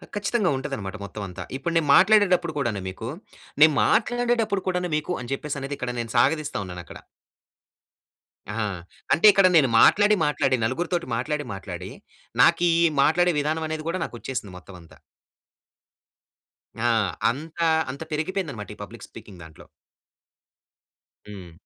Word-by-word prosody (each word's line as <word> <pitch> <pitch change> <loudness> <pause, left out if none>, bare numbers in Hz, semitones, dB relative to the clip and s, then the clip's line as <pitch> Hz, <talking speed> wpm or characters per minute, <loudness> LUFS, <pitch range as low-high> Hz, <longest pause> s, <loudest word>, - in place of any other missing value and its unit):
ఆహ్, - - -14
ఖచ్చితంగా 205 -1 0
ఉంటదన్నమాట 105 -6 -5
మొత్తం 100 +1 -7
అంతా. 90 0 -8
ఇప్పుడు 165 +5 -3
నేను 155 -3 +1
మాట్లాడేటప్పుడు 185 -3 +4
కూడాను 115 -7 -1
మీకు, 110 +5 -7 0.5
నేను 155 0 +8
మాట్లాడేటప్పుడు 230 -4 +1
కూడాను 180 -1 -1
మీకు 155 +4 -3
అని 120 +1 -8
చెప్పేసి 145 +1 -5
అనేది 140 +1 -4
ఇక్కడ 125 -1 -3 0.3
సాగదిస్తా 150 +4 +1
ఉన్నానక్కడ. 90 -3 -9 1.5
ఆ! - - -5 0.6
అంటే 165 - +4
ఇక్కడ 195 -1 +5
నేను 140 -4 +5
మాట్లాడి, 205 +1 +5
మాట్లాడి 135 -3 +1
నలుగురితోటి 170 +8 -2
మాట్లాడి, 150 +4 -2
మాట్లాడి 95 -4 -7 0.5
నాకీ 175 0 +4 0.3
మాట్లాడే 175 +4 +3
విధానమనేది 155 +1 -3
కూడా 185 +2 -2
నాకొచ్చేసింది 120 -5 -6
మొత్తం 90 +1 -14
అంతా. 85 - -18 1.8
ఆ! - - -2 0.5
అంతా, 160 +5 -3 0.2
అంత 140 +4 -7
పెరిగిపోయిందన్నమాట. 155 - -3
ఈ - - -32
పబ్లిక్ - - -12
స్పీకింగ్ 95 -3 -13
దాంట్లో. 80 -1 -15 1.6
హ్మ్. 90 -4 -10
150 Hz, 125 wpm, -24 LUFS, 120-180 Hz, 1.8 s, నేను